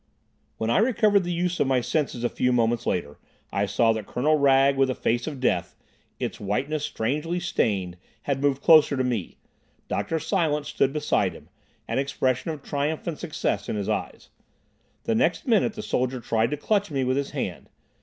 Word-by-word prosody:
When 110 Hz, +1 st, -1 dB
I -, -, +4 dB
recovered 215 Hz, -4 st, +3 dB
the 175 Hz, -, -2 dB
use 175 Hz, +1 st, -1 dB
of -, -, +2 dB
my 130 Hz, -1 st, +3 dB
senses 130 Hz, -2 st, -2 dB
a 120 Hz, -, +2 dB
few 125 Hz, -, 0 dB
moments 120 Hz, -1 st, +1 dB
later 75 Hz, -5 st, -2 dB, 0.3 s
I 100 Hz, +1 st, +1 dB
saw 115 Hz, +3 st, +3 dB
that 110 Hz, -2 st, -5 dB
Colonel 150 Hz, +5 st, +2 dB
Wragge 140 Hz, -1 st, +4 dB
with 135 Hz, -1 st, +2 dB
a 130 Hz, -, -1 dB
face 120 Hz, +3 st, -1 dB
of 145 Hz, -4 st, -5 dB
death, 130 Hz, -, 0 dB, 0.4 s
its -, -, -4 dB
whiteness 140 Hz, +10 st, -2 dB
strangely 150 Hz, +9 st, -2 dB
stained, 95 Hz, -, -1 dB, 0.3 s
had 135 Hz, -1 st, -1 dB
moved 140 Hz, -1 st, +1 dB
closer 155 Hz, -3 st, +6 dB
to 130 Hz, -, +1 dB
me. 120 Hz, -8 st, -3 dB, 0.5 s
Dr. 165 Hz, -, -1 dB
Silence 160 Hz, -3 st, 0 dB
stood 135 Hz, -, +1 dB
beside 150 Hz, 0 st, 0 dB
him, -, -, -14 dB, 0.4 s
an -, -, -1 dB
expression 135 Hz, +1 st, -1 dB
of 155 Hz, -3 st, -5 dB
triumph 145 Hz, +2 st, -2 dB
and 165 Hz, -3 st, -4 dB
success 100 Hz, -9 st, -2 dB
in -, -, -1 dB
his 100 Hz, -2 st, -3 dB
eyes. -, -, -4 dB, 0.7 s
The 230 Hz, -, 0 dB
next 250 Hz, +7 st, +1 dB
minute 230 Hz, -3 st, +2 dB
the 215 Hz, -1 st, -7 dB
soldier 130 Hz, -5 st, -1 dB
tried 115 Hz, -1 st, 0 dB
to 150 Hz, -, -2 dB
clutch 205 Hz, +5 st, 0 dB
me 135 Hz, -3 st, -1 dB
with 130 Hz, 0 st, +1 dB
his 140 Hz, 0 st, -1 dB
hand. -, -, -5 dB
140 Hz, 190 wpm, -25 LUFS, 120-160 Hz, 0.7 s, closer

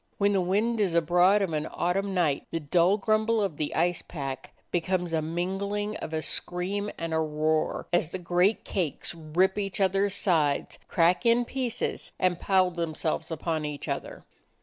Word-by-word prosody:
When 200 Hz, 0 st, +3 dB
the 195 Hz, -, +2 dB
wind 215 Hz, +5 st, +1 dB
is 185 Hz, -5 st, +1 dB
abroad 180 Hz, +5 st, +4 dB
of 175 Hz, -4 st, -2 dB
an 155 Hz, 0 st, -1 dB
autumn 195 Hz, +2 st, -1 dB
night 155 Hz, -6 st, +1 dB
the 165 Hz, -, -2 dB
dull 170 Hz, +6 st, +3 dB
grumble 220 Hz, +2 st, +2 dB
of 195 Hz, -8 st, -1 dB
the 150 Hz, -, -2 dB
ice 175 Hz, +1 st, +1 dB
pack 135 Hz, -4 st, -6 dB, 0.2 s
be 175 Hz, -, +1 dB
comes 180 Hz, -1 st, -1 dB
a 160 Hz, -, +2 dB
mingling 195 Hz, +6 st, -2 dB
of -, -, -6 dB
a 160 Hz, -1 st, -2 dB
scream 195 Hz, +4 st, -2 dB
and 165 Hz, -1 st, -3 dB
a 160 Hz, -, +2 dB
roar, 155 Hz, 0 st, 0 dB
as 175 Hz, -2 st, +2 dB
the 185 Hz, -, -4 dB
great 180 Hz, +4 st, +1 dB
cakes 175 Hz, -6 st, -2 dB
rip 170 Hz, +5 st, +1 dB
each 195 Hz, -1 st, -3 dB
other's 195 Hz, +1 st, +2 dB
sides, 155 Hz, -7 st, +1 dB
crack 175 Hz, +2 st, +3 dB
in 235 Hz, +1 st, +4 dB
pieces, 245 Hz, -2 st, -3 dB
and 180 Hz, -2 st, +1 dB
pile 185 Hz, -2 st, +3 dB
themselves 160 Hz, -1 st, -2 dB
upon 160 Hz, -1 st, -2 dB
each 150 Hz, -1 st, -5 dB
other. -, -, -5 dB
180 Hz, 175 wpm, -27 LUFS, 160-200 Hz, 0.2 s, abroad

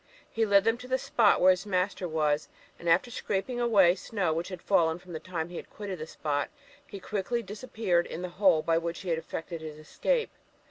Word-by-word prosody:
He 225 Hz, -1 st, +1 dB
led 200 Hz, -1 st, +5 dB
them 225 Hz, +2 st, +1 dB
to 250 Hz, -, -9 dB
the 260 Hz, 0 st, +1 dB
spot 230 Hz, -4 st, +3 dB
where 185 Hz, -, +7 dB
his 185 Hz, +2 st, -1 dB
master 185 Hz, -1 st, 0 dB
was, 155 Hz, -2 st, 0 dB, 0.3 s
and, 170 Hz, -, -2 dB
after 180 Hz, +9 st, +3 dB
scraping 220 Hz, +4 st, -2 dB
away 205 Hz, -7 st, +5 dB
the 180 Hz, -, -3 dB
snow 190 Hz, -5 st, -1 dB
which 165 Hz, +2 st, -2 dB
had 185 Hz, -, -6 dB
fallen 165 Hz, -4 st, +2 dB
from 180 Hz, 0 st, -12 dB
the 160 Hz, -, -4 dB
time 170 Hz, -2 st, -4 dB
he 175 Hz, -, -7 dB
had -, -, -8 dB
quitted 200 Hz, -4 st, -6 dB
the 155 Hz, -, -5 dB
spot, 145 Hz, -2 st, -2 dB, 0.4 s
he 200 Hz, -, -8 dB
quickly 215 Hz, +5 st, -2 dB
disappeared 210 Hz, -4 st, -1 dB
in 175 Hz, -, -6 dB
the 180 Hz, -, -3 dB
hole 175 Hz, -6 st, +5 dB
by 165 Hz, 0 st, +2 dB
which 170 Hz, 0 st, -4 dB
he 185 Hz, -, -5 dB
had 165 Hz, -1 st, +1 dB
effected 165 Hz, 0 st, -6 dB
his 155 Hz, -1 st, -7 dB
escape. 460 Hz, -, -1 dB
185 Hz, 225 wpm, -29 LUFS, 165-210 Hz, 0.4 s, where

